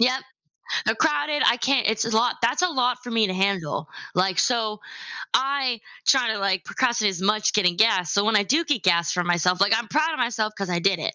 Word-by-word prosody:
Yup, 255 +2 +2 0.6
they're - - +1
crowded. 295 -1 0
I 240 - +4
can't, 255 -2 +1
it's 225 0 -1
a 225 -1 -2
lot 235 +2 +2
that's 245 +7 +1
a 365 - +2
lot 250 -5 0
for 245 - -8
me 225 -2 +2
to 185 - -3
handle. 185 -5 -2 0.3
Like, 185 -1 +1
so 220 -4 0 0.5
I 265 -3 0 0.3
try 255 -4 +3
to, 220 - -4
like, 195 -2 -1
procrastinate 235 -6 0
as 185 - -7
much 215 +2 +1
getting 180 -4 +2
gas, 190 -6 +2
so 200 +1 +1
when 225 -1 +3
I 205 - +4
do 285 +11 +1
get 290 - -2
gas 170 -2 +2
for 180 0 -1
myself, 175 +1 +1
like, 200 +3 +3
I'm 225 0 -2
proud 310 +5 0
of 310 - -5
myself 230 -3 -1
'cause 195 -1 -4
I 175 -1 -1
did 190 0 +1
it, 155 - -4
220 Hz, 230 wpm, -23 LUFS, 190-255 Hz, 0.6 s, I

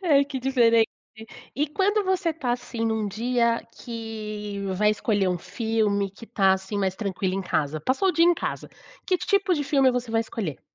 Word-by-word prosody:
Ai 280 -4 +5
que 275 -2 -5
diferente! 230 -4 +4 0.7
E 295 +4 +1
quando 405 +5 +1
você 370 -3 +1
tá 265 -6 -2
assim 245 -2 -4
num 220 -1 0
dia 235 +2 +1 0.2
que 215 -3 -6 0.2
vai 210 +2 +3
escolher 205 -2 +1
um 180 - -1
filme, 210 -1 -1
que 220 +4 -13
tá 195 -4 +3
assim 190 +2 -4
mais 190 -1 0
tranquilo 190 -2 -2
em 195 - -2
casa, 155 -3 -1
passou 270 - +1
o - - +3
dia 335 - +4
em 350 0 +5
casa. - - -4 0.4
Que 365 -2 +2
tipo 395 -2 +1
de 290 -2 -2
filme 270 -2 +4
você 245 -1 -3
vai 225 0 +2
escolher? 210 - -4
230 Hz, 190 wpm, -25 LUFS, 205-275 Hz, 0.7 s, Ai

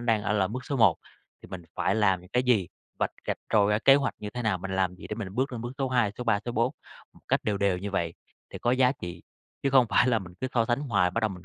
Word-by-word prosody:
đang 115 -3 +1
ở 105 - 0
là 100 -3 +2
bước 130 +3 -5
số 140 - -2
1 105 -9 +5 0.5
thì - - -12
mình 95 -2 -7
phải - - +1
làm 95 -4 +2
những 90 - -16
cái 125 - +2
gì, 115 -8 +2 0.3
vạch - - 0 0.2
rạch - - -1
ròi 105 -1 +4
ra 105 - +3
kế 135 +4 +6
hoạch 140 0 +1
như 105 - -6
thế 120 +2 -5
nào, 105 -4 +1
mình 95 +2 -6
làm 95 -1 +1
gì - - -10
để 105 - -4
mình 100 -4 -6
bước 130 +1 0
lên 120 - -4
bước 120 - -5
số 135 - 0
2, 120 -5 +1
số 125 - -4
3, 110 -4 +2
số 120 - -3
4, 115 +1 +1 0.4
một - - -21
cách - - +1
đều 105 -2 0
đều 100 -3 +1
như 100 +2 -5
vậy 85 -4 -1 0.4
để - - -7
có 120 - 0
giá 130 0 +4
trị, 85 -8 -8 0.4
chứ 140 - +1
không 130 -2 +5
phải 120 - +4
là 115 -2 +3
mình 90 -3 -11
cứ 130 - -1
so 115 - +3
sánh 120 +3 0
hoài, 100 -11 +1
bắt 115 - -1
đầu 110 - +1
mình 90 -2 -10
110 Hz, 305 wpm, -27 LUFS, 95-125 Hz, 0.5 s, kế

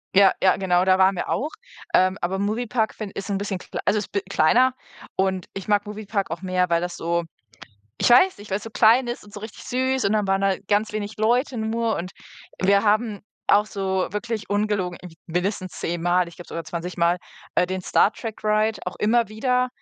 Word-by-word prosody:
Ja, 195 -1 +7
ja, 185 -1 +4
genau, 180 -2 +2
da 185 0 +4
waren 190 0 +4
wir - - -4
auch. 295 +4 -1 0.4
Ähm, 185 +1 +4
aber 190 +2 -1
Movie 215 +4 -1
Park 220 -1 -1
find 210 -3 -7
ist 195 +1 -5
'n 200 - 0
bisschen 195 -2 -3
klei - - -7
also 215 - +3
ist 205 - -7
b 200 - 0
kleiner 240 +9 +4 0.4
und 190 -1 0
ich 195 - -7
mag 205 0 +2
Movie 210 0 -7
Park 200 -4 -1
auch 165 - -4
mehr, 185 -1 +1
weil 170 0 +2
das 175 0 -4
so 170 0 -1 0.7
ich - - +2
weiß 365 +11 +6
nicht, 205 0 -12
weil‘s 195 +2 -2
so 225 - -7
klein 230 +3 +5
ist 240 0 -4
und 205 - -16
so 210 - -7
richtig 215 +1 -9
süß 260 +1 0
und 200 - +2
dann 210 -2 +1
waren 195 0 +1
da 195 -1 +2
ganz 210 +2 +1
wenig 210 0 -4
Leute 240 +4 +1
nur 225 +1 0
und 180 +2 -4 0.5
wir 200 +1 +4
haben 215 0 +1 0.3
auch 205 +1 +4
so 190 -3 -1
wirklich 210 +2 -4
ungelogen, 205 -4 0
m 180 - -10 0.2
mindestens 185 +1 -2
zehnmal, 175 +1 +1
ich 170 - -12
glaube 175 - -12
sogar 165 - -5
zwanzigmal, 170 +1 -1 0.4
äh, - - +4
den 185 +1 -3
Star 195 +3 +3
Trek 225 -3 -7
Ride 215 +1 +1
auch 180 - -4
immer 230 +1 +2
wieder, 250 +4 0
200 Hz, 215 wpm, -23 LUFS, 185-220 Hz, 0.7 s, Ja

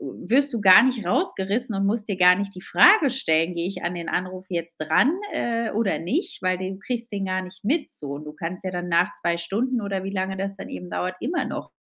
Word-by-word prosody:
wirst 245 - 0
du 230 - -1
gar 195 +4 +8
nicht 250 -5 0
rausgerissen 200 +6 0
und 195 0 0
musst 215 +2 0
dir 200 - -1
gar 180 0 +6
nicht 200 0 -4
die 185 - -9
Frage 360 -8 +6
stellen: 165 -9 +1
„Gehe 170 - -1
ich 195 - -7
an 175 +1 -2
den 170 -1 -6
Anruf 185 +1 -3
jetzt 170 -2 -5
ran, 160 - +3 0.2
äh, 230 -1 -1
oder 215 -2 0
nicht?“ 255 - -3
Weil 185 0 +1
du 190 +1 -5
kriegst 235 +2 -4
den 195 -1 -2
gar 185 0 -1
nicht 185 +1 -12
mit 290 +8 0
so. 145 -2 -8
Und 145 +2 -7
du 150 - -8
kannst 165 +4 -6
ja 185 - -2
dann 180 0 -4
nach 170 +1 +2
2 170 0 -1
Stunden 230 +9 -1
oder 195 -2 -3
wie 195 - -3
lange 190 0 -2
das 195 +1 -4
dann - - -8
eben 180 - -7
dauert, 185 +1 -3
immer 335 +7 -1
noch - - -6
190 Hz, 245 wpm, -24 LUFS, 180-230 Hz, 0.2 s, gar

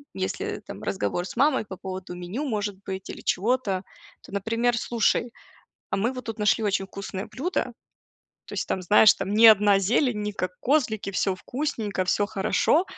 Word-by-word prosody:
если 400 - -3
там - - -9
разговор 180 -2 -2
с - - -9
мамой 275 0 +3
по 190 - -8
поводу 185 -1 -6
меню 180 +10 -5
может 205 -6 -2
быть 190 -1 -6
или - - -9
чего-то, 200 -2 0 0.4
то, - - -14
например: 230 +4 0
"Слушай, 235 +1 +1 0.6
а - - 0
мы 230 +6 0
вот 255 -1 -7
тут 225 -1 -5
нашли 210 +1 +2
очень 195 -1 0
вкусное 195 0 -6
блюдо. 255 +3 -2 0.7
То - - -12
есть - - -3
там, 185 - -1
знаешь, 210 +3 +7
там 200 - -3
не 225 +2 +8
одна 205 -2 +6
зелень, 225 +2 +1
не 210 0 -2
как 185 -2 -3
козлики, 240 -8 +1
всё 195 0 0
вкусненько, 220 -3 -3
всё 205 +2 +1
хорошо, 215 - +2
210 Hz, 175 wpm, -25 LUFS, 190-240 Hz, 0.7 s, не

